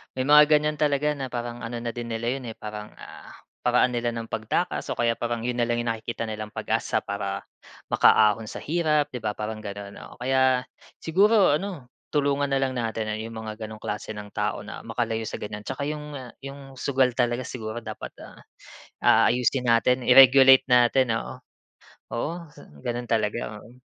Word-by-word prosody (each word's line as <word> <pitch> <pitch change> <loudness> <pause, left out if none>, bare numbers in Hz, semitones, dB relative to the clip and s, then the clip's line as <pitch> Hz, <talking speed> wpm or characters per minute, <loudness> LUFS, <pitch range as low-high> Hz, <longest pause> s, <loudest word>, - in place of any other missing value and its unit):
may 130 - -1
mga 150 +2 +7
ganiyan 150 0 +2
talaga 150 0 +2
na 140 -3 -4
parang 120 -1 -5
ano 115 +1 -6
na 120 0 -3
din 120 0 -6
nila 115 +1 -2
'yun, 125 - -9
eh, 110 - -6
parang, 105 0 -8
ah, - - -12 0.2
paraan 125 +1 +3
nila 120 -1 -2
ng 115 0 -6
pagtakas 115 +11 -2
o - - -2
kaya 120 -1 +2
parang 120 -1 -2
'yun 125 0 -2
na 120 - +2
lang 120 - +1
'yung 120 - 0
nakikita 115 +1 -4
nilang 110 -1 -6
pag-asa - - -1
para 100 -1 -4 0.5
makaahon 110 0 +4
sa - - -7
hirap 150 -2 +1
'di 125 - -5
ba, 105 -2 -3
parang 110 0 -4
gano'n, 100 -1 -7 0.2
oo. - - -14
Kaya 130 -1 +3 0.4
siguro 195 -2 +4
ano, 175 -11 -7 0.2
tulungan 145 0 +2
na 135 - 0
lang 135 -1 +1
natin 110 -3 -3
'yong 115 +1 -7
mga 110 0 -7
gano'ng 110 0 -8
klase 105 +1 -4
ng 105 0 -9
tao - - -2
na - - -9
makalayo 115 -2 -2
sa - - -4
ganiyan, 105 0 -7
'tsaka 135 +1 -3
'yong 145 -4 -5 0.2
'yong 135 -1 -11
sugal 130 -2 +2
talaga 120 0 0
siguro 115 -1 -6
dapat, - - -8 0.9
ah, - - +5
ayusin 125 +1 +1
natin, 120 +2 +3
i-regulate 135 +1 +8
natin 125 -1 +4
oo, - - -7 0.7
oo, 120 +7 -1 0.5
gano'n 120 +10 -4
talaga, 110 -1 -1
oo 120 +4 -16
120 Hz, 180 wpm, -25 LUFS, 110-135 Hz, 0.9 s, i-regulate